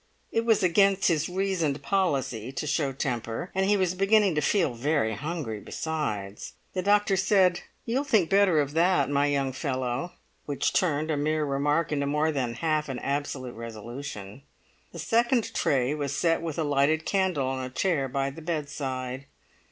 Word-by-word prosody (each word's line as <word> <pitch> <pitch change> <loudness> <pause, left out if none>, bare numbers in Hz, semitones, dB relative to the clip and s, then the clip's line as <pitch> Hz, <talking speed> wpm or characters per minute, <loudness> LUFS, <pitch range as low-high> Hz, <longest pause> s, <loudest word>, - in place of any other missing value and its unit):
It 225 0 0
was 220 -3 +3
against 195 +2 +4
his 165 -1 +1
reasoned 180 -6 -1
policy 135 - 0
to 135 - -4
show 145 -2 0
temper, 120 +2 -3
and 190 0 +1
he 205 0 +4
was 185 -2 +1
beginning 195 0 +3
to 150 - 0
feel 170 -6 +2
very 120 -2 0
hungry 145 -8 -4
besides. 105 -9 -4 0.2
The 185 - -1
doctor 205 +1 +3
said, 190 -2 +3 0.3
"You'll 250 +4 0
think 220 - +2
better 195 -4 +4
of 145 -1 -1
that, 175 -1 +2
my 145 0 +2
young 140 -2 0
fellow," 130 +3 -3 0.3
which 145 -2 0
turned 155 -3 +1
a 150 - 0
mere 155 +1 0
remark 145 +4 0
into 140 -1 0
more 150 +2 +1
than 125 -5 -2
half 155 +2 0
an 130 - -3
absolute 140 -2 -3
resolution. 115 0 -8 0.5
The - - -10
second 235 0 +1
tray 130 0 +1
was 145 -2 -3
set 165 -1 +2
with 165 -3 -4
a 165 - +1
lighted 145 +2 +2
candle 185 -8 +1
on 130 0 -2
a 130 - -5
chair 140 0 0
by 135 +1 -1
the 165 - -10
bedside. 140 -5 -4
150 Hz, 170 wpm, -27 LUFS, 135-180 Hz, 0.5 s, against